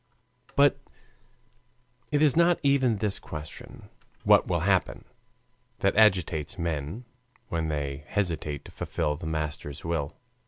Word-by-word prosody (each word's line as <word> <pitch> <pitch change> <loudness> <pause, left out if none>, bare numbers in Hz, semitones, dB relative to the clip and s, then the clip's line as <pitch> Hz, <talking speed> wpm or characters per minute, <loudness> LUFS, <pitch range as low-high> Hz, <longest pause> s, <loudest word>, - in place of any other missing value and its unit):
But - - +5 1.3
it 150 +1 +3
is 145 -4 +5
not 170 +1 +4
even 135 -5 +3
this 100 -1 0
question 75 -4 -9 0.4
"What - - +5
will - - 0
happen?" - - +1 0.8
that 95 -1 +2
agitates 90 -6 +3
men 85 - -3 0.4
when 80 -2 -1
they 75 -2 -3
hesitate 80 -7 -2
to - - -11
fulfill 75 -3 -2
the 80 +2 -7
Master's 75 -2 -4
will. 80 -4 -2
85 Hz, 120 wpm, -27 LUFS, 75-105 Hz, 1.3 s, But